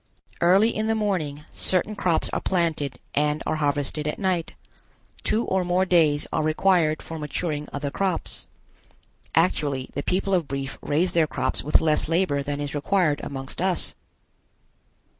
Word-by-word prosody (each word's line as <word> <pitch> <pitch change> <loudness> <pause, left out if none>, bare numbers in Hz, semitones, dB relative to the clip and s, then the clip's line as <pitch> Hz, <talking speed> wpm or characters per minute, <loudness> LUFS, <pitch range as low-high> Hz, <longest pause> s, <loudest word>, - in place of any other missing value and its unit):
Early 195 +6 +4
in 215 +1 -1
the 225 - +2
morning 160 -9 -2
certain 190 +3 +1
crops 175 -5 +2
are - - -2
planted 160 -7 0 0.2
and 150 +1 +1
are 155 - 0
harvested 145 0 -1
at 150 - -2
night. 185 -4 -1 0.7
Two 225 +2 +1
or 190 -1 +1
more 180 +1 +2
days 160 -5 +3
are - - +1
required 155 0 +2
for 165 -1 -7
maturing 150 0 -3
other 145 0 -3
crops. 190 0 -2 0.9
Actually 145 -6 +1
the 145 - -2
people 190 +5 0
of 175 -5 +2
Brief 135 0 -4
raise 165 +5 +1
their 165 -2 +3
crops 130 -3 0
with 150 - +3
less 155 -1 +2
labor 165 -4 +1
than 145 +1 -3
is 145 -1 -4
required 155 0 +1
amongst 135 +2 -6
us. 185 -2 0
160 Hz, 155 wpm, -25 LUFS, 145-185 Hz, 0.9 s, Early